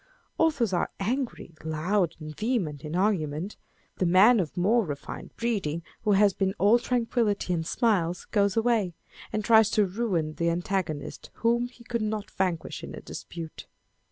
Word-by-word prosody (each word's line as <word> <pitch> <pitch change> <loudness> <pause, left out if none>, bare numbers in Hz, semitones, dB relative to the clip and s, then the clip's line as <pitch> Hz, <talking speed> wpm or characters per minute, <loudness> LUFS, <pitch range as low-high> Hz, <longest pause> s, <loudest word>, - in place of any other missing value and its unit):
Authors 280 - +2
are 175 - +1
angry, 230 -3 -2
loud, 170 +3 0
and 155 -1 -8
vehement 190 - -1
in 155 +2 -4
argument: 180 -2 0 0.4
the 185 - +1
man 205 +7 +6
of 170 -3 -3
more 220 +6 +3
refined 145 -6 -6
breeding, 195 -9 -1 0.2
who 210 - +2
has 200 0 +5
been 195 +1 0
"all 210 +5 +5
tranquillity 230 -6 0
and 160 -2 -2
smiles," 180 -8 +1
goes 200 -1 +2
away, 225 -7 +2 0.4
and 215 -1 -2
tries 220 -2 +6
to 210 -2 +3
ruin 185 -6 -1
the 170 +2 0
antagonist 170 -3 -3 0.2
whom 235 +1 +3
he 245 -1 -17
could 235 0 -2
not 210 -2 -3
vanquish 180 -4 -2
in - - -7
a - - -7
dispute. 165 -2 -8
195 Hz, 155 wpm, -27 LUFS, 170-230 Hz, 0.4 s, man